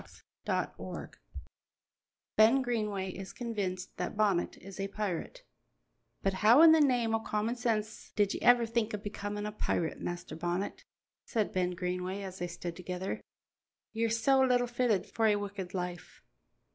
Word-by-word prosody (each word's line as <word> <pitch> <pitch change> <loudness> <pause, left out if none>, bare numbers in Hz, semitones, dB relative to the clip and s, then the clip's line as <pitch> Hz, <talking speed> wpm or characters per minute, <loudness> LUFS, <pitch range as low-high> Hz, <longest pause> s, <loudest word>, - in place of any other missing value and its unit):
CHAPTER - - 0
VIII - - -9 0.9
BEN 230 +5 +6
GREENWAY 210 -6 -1
IS 190 +1 -8
CONVINCED 195 -6 -4
THAT - - -3
BONNET 200 -5 +2
IS 195 +1 -11
A 195 - -1
PIRATE 210 - -4 0.8
"But 195 - +2
how 235 +8 +8
in 330 - +10
the 320 -1 +6
name 245 -5 +3
o' 225 - +3
common 220 +1 -1
sense 220 -3 -2
did 205 -2 +2
ye - - -5
ever 245 -1 +6
think 225 -1 0
o' - - -3
becomin' 205 0 -4
a 210 - -3
pirate, 175 -5 -1
Master 175 -2 -5
Bonnet?" 175 +4 -3 0.4
said 220 -4 -1
Ben 180 -1 0
Greenway 180 +2 -3
as 190 -1 -7
they 175 - -2
stood 175 0 -6
together. 180 +1 -4 0.7
"Ye're 230 0 +1
so 250 +4 +3
little 250 -2 +4
fitted 240 -4 +1
for 225 -1 +1
a 210 - +4
wicked 200 -2 -5
life." 180 -1 -5
205 Hz, 160 wpm, -31 LUFS, 185-230 Hz, 0.9 s, in